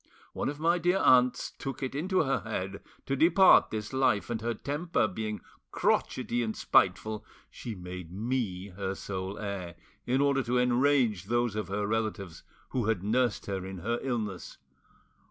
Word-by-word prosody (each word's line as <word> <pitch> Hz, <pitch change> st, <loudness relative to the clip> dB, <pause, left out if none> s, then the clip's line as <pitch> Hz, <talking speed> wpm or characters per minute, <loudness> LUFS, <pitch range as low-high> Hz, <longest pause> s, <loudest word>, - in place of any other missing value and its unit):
One -, -, -2 dB
of 145 Hz, +1 st, -6 dB
my 170 Hz, +2 st, +2 dB
dear 175 Hz, +3 st, +2 dB
aunts 125 Hz, -6 st, +4 dB
took 135 Hz, -1 st, -5 dB
it 130 Hz, -, -3 dB
into 180 Hz, +5 st, +1 dB
her 135 Hz, -2 st, +1 dB
head 100 Hz, -3 st, -4 dB, 0.2 s
to 135 Hz, -, -1 dB
depart 175 Hz, +6 st, +6 dB
this 105 Hz, +2 st, -5 dB
life, 125 Hz, -5 st, +1 dB
and 115 Hz, -1 st, -2 dB
her 115 Hz, +1 st, -1 dB
temper 145 Hz, +2 st, -1 dB
being 105 Hz, +2 st, -4 dB, 0.3 s
crotchety 120 Hz, -, 0 dB
and 110 Hz, -2 st, -3 dB
spiteful 110 Hz, -1 st, +2 dB, 0.3 s
she 115 Hz, -3 st, -7 dB
made 90 Hz, -2 st, -8 dB
me 100 Hz, -3 st, -2 dB
her 95 Hz, +1 st, -4 dB
sole 95 Hz, 0 st, -5 dB
heir, 100 Hz, -5 st, -5 dB, 0.3 s
in 130 Hz, +2 st, +2 dB
order 140 Hz, -1 st, +3 dB
to 125 Hz, 0 st, 0 dB
enrage 125 Hz, -5 st, +2 dB
those 120 Hz, 0 st, 0 dB
of 105 Hz, -4 st, -2 dB
her 100 Hz, +1 st, -2 dB
relatives 105 Hz, -5 st, -2 dB, 0.3 s
who 125 Hz, -4 st, -1 dB
had 110 Hz, -5 st, 0 dB
nursed 120 Hz, +2 st, +1 dB
her 95 Hz, -2 st, -3 dB
in 95 Hz, 0 st, -7 dB
her 115 Hz, +7 st, -2 dB
illness. 110 Hz, -8 st, -4 dB
110 Hz, 165 wpm, -29 LUFS, 100-130 Hz, 0.3 s, depart